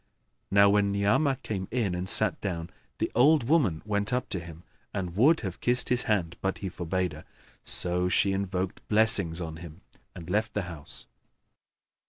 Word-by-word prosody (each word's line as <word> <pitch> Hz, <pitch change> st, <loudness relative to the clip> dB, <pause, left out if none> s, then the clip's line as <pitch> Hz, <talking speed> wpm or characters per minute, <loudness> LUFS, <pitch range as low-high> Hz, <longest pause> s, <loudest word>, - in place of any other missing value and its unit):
Now 100 Hz, 0 st, +5 dB
when 100 Hz, -1 st, +2 dB
Ni'amah 110 Hz, +8 st, +2 dB
came 95 Hz, -3 st, -4 dB
in 110 Hz, -6 st, -1 dB
and 90 Hz, +1 st, -3 dB
sat -, -, +1 dB
down, 85 Hz, -3 st, -4 dB, 0.3 s
the -, -, -2 dB
old 145 Hz, +4 st, +4 dB
woman 130 Hz, -, +2 dB
went 105 Hz, 0 st, -1 dB
up 125 Hz, 0 st, -1 dB
to 95 Hz, -, -3 dB
him 85 Hz, 0 st, -11 dB, 0.3 s
and 90 Hz, -3 st, -4 dB
would 150 Hz, +10 st, +4 dB
have 95 Hz, -6 st, -6 dB
kissed 125 Hz, 0 st, +4 dB
his 125 Hz, 0 st, +2 dB
hand, 90 Hz, -6 st, 0 dB
but 95 Hz, 0 st, -1 dB
he 95 Hz, -, -5 dB
forbade 90 Hz, +1 st, -2 dB
her; -, -, -11 dB, 0.4 s
so 90 Hz, 0 st, +1 dB
she 100 Hz, +1 st, +2 dB
invoked 95 Hz, -1 st, -3 dB
blessings[FN#9] 100 Hz, -6 st, +2 dB
on 80 Hz, 0 st, -8 dB
him 85 Hz, +1 st, -11 dB, 0.3 s
and 85 Hz, -2 st, -9 dB
left 105 Hz, +4 st, -1 dB
the 105 Hz, -, 0 dB
house. 85 Hz, -5 st, -9 dB
95 Hz, 175 wpm, -28 LUFS, 90-110 Hz, 0.4 s, Now